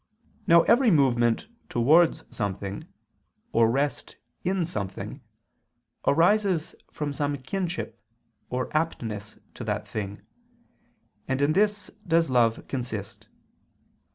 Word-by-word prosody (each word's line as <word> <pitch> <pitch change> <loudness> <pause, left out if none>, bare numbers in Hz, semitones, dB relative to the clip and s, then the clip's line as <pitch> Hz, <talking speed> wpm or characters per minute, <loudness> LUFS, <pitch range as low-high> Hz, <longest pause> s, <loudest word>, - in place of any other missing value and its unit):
Now 170 0 +7
every 240 +1 +5
movement 130 - +3 0.2
towards 155 +8 +4
something, 100 -1 -4 0.6
or 115 0 +4
rest 140 +4 -1 0.3
in 185 -1 +1
something, 100 - -5 0.9
arises 175 +2 +3 0.2
from 150 -2 -3
some 145 +1 -1
kinship 175 +6 -4 0.5
or 125 +3 -3
aptness 110 -10 -2 0.2
to - - -7
that - - -2
thing; 105 -1 -5 1.0
and 130 0 0
in 145 +2 +3
this 205 0 +1 0.2
does 165 -3 +3
love 115 -3 +2
consist. 115 -7 -5
140 Hz, 100 wpm, -26 LUFS, 115-170 Hz, 1.0 s, Now